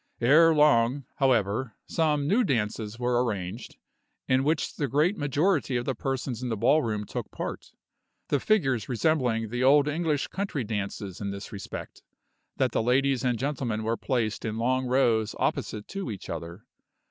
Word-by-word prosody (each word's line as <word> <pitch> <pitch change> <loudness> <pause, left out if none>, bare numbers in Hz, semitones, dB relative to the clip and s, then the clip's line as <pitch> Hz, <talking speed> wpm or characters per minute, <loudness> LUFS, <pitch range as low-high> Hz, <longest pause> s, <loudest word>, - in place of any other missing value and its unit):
Ere 155 +7 +6
long, 140 -3 +3
however, 115 -2 +1
some 150 -3 0
new 215 +9 +3
dances 110 - -1
were 125 0 +1
arranged, 105 -1 -4 0.5
in 130 +1 +3
which 155 +2 0
the 145 - 0
great 150 - +2
majority 145 -2 +1
of 120 - -3
the 135 - 0
persons 130 -1 -3
in 125 - -3
the 110 - -2
ballroom 115 -3 +2
took - - -5
part; - - -6 0.6
the 145 - +2
figures 135 - +1
resembling 120 -3 +1
the 120 +3 -2
old 140 +2 +5
English 150 -1 0
country 190 -9 -3
dances 100 -3 -4
in 100 - -2
this 100 +1 -7
respect, 100 -2 -8 0.6
that - - +1
the - - +1
ladies 130 +2 +2
and 125 -2 +1
gentlemen 125 -5 -2
were 115 +1 0
placed 115 -4 -1
in 110 -1 -3
long 130 +2 0
rows 115 -4 +2
opposite 105 -1 -2
to 195 -7 -5
each 100 -4 -6
other. 85 +3 -7
125 Hz, 160 wpm, -27 LUFS, 110-145 Hz, 0.6 s, Ere